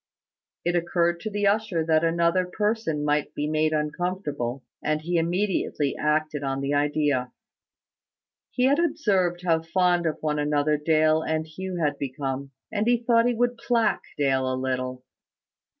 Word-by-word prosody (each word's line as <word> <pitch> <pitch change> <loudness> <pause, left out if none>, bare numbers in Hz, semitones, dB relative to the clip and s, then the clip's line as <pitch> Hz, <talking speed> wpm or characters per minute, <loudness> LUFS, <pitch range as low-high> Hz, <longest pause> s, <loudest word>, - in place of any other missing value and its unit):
It 175 0 +1
occurred 170 0 +1
to 215 - -4
the 205 -1 -1
usher 200 -5 +1
that 160 0 +3
another 170 +2 +2
person 210 -6 -1
might 150 0 0
be 145 - -1
made 155 0 +1
uncomfortable; 150 -5 -2 0.2
and 155 0 0
he 170 +3 -1
immediately 175 -4 0
acted 155 -1 0
on 135 -1 -2
the 140 +1 -1
idea. 145 -3 +1 1.2
He 250 - -1
had 275 +4 +4
observed 200 - +1
how 165 -2 +3
fond 175 +1 +1
of 155 - -1
one 150 -1 0
another 150 0 +1
Dale 155 +1 +3
and 160 0 -1
Hugh 185 +4 -6
had 150 -4 0
become; 135 0 -4 0.2
and 215 0 0
he 240 0 +4
thought 230 0 +4
he 245 - +1
would 245 0 0
plague 230 -3 +1 0.2
Dale 130 -2 +1
a 130 - -1
little. 130 -1 -3
160 Hz, 155 wpm, -25 LUFS, 145-185 Hz, 1.2 s, had